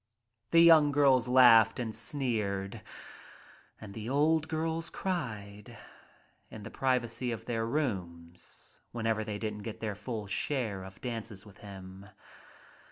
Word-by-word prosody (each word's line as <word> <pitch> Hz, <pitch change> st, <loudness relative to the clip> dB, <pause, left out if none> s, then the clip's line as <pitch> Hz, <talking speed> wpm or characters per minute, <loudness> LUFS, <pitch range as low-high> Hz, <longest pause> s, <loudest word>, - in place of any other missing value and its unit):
The 165 Hz, -, +6 dB
young 160 Hz, -3 st, +7 dB
girls 135 Hz, -4 st, +4 dB
laughed 120 Hz, -3 st, +6 dB
and 115 Hz, -3 st, -3 dB
sneered 110 Hz, -6 st, -2 dB, 1.0 s
and 105 Hz, -2 st, -10 dB
the 110 Hz, +2 st, -6 dB
old 155 Hz, +3 st, +2 dB
girls 165 Hz, +1 st, -2 dB
cried 105 Hz, -, -5 dB, 0.7 s
in 110 Hz, -, -10 dB
the 110 Hz, -, -8 dB
privacy 125 Hz, -2 st, -1 dB
of 115 Hz, -1 st, -6 dB
their 115 Hz, -2 st, -2 dB
rooms 90 Hz, -, -4 dB
whenever 110 Hz, -2 st, -1 dB
they 105 Hz, -1 st, -4 dB
didn't 105 Hz, -1 st, -4 dB
get 110 Hz, +1 st, -7 dB
their 110 Hz, -2 st, -3 dB
full 105 Hz, +1 st, -5 dB
share 105 Hz, -2 st, -2 dB
of 95 Hz, 0 st, -12 dB
dances 115 Hz, -5 st, -6 dB
with 105 Hz, -1 st, -16 dB
him. 95 Hz, -1 st, -11 dB
115 Hz, 130 wpm, -30 LUFS, 105-130 Hz, 1.0 s, young